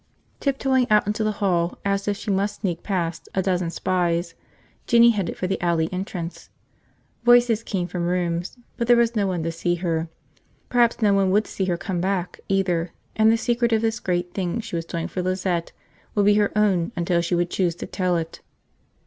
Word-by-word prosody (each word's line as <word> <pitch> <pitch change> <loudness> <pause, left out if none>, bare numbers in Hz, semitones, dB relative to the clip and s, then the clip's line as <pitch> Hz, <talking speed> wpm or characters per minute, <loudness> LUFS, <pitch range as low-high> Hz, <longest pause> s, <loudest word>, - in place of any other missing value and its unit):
Tiptoeing 265 -2 +1
out 210 0 +4
into 210 +2 -1
the 215 0 0
hall 175 -3 +1
as 200 0 0
if 205 -1 0
she 210 - -3
must 200 +2 -1
sneak 175 -4 -2
past 170 -5 -3
a 190 - +1
dozen 180 -2 0
spies, 170 -1 -1 0.5
Jinny 235 -1 +6
headed 200 -6 -2
for - - -2
the 190 +1 -2
alley 170 -2 +1
entrance. 180 -2 -5 0.7
Voices 240 -2 +5
came 190 -5 -2
from 175 -1 -3
rooms, 175 +2 -1 0.2
but 235 - -1
there 240 0 +6
was 235 0 +2
no 205 -2 +1
one 180 -3 -2
to 165 - -1
see 175 +1 -1
her 165 -2 -1
go. - - -17 0.6
Perhaps 240 -1 +2
no 205 -1 +5
one 195 -1 +3
would 205 +3 +3
see 190 - -3
her 175 -2 0
come 175 0 -3
back, 185 -1 -2
either, 180 -3 0 0.2
and 220 0 +5
the 230 - +3
secret 235 0 0
of 220 0 +2
this 225 +1 0
great 175 -1 -2
thing 190 +3 -2
she 225 -5 -5
was 165 -1 -2
doing 165 0 -3
for 185 - -3
Lizette 185 -2 -1 0.4
would 205 -1 +3
be 205 - +6
her 205 -1 +2
own 190 -5 +2
until 170 0 +1
she 175 +1 0
would 175 0 0
choose 175 -3 0
to - - -6
tell 180 -2 0
it. 165 -1 -5
185 Hz, 205 wpm, -23 LUFS, 175-210 Hz, 0.7 s, Jinny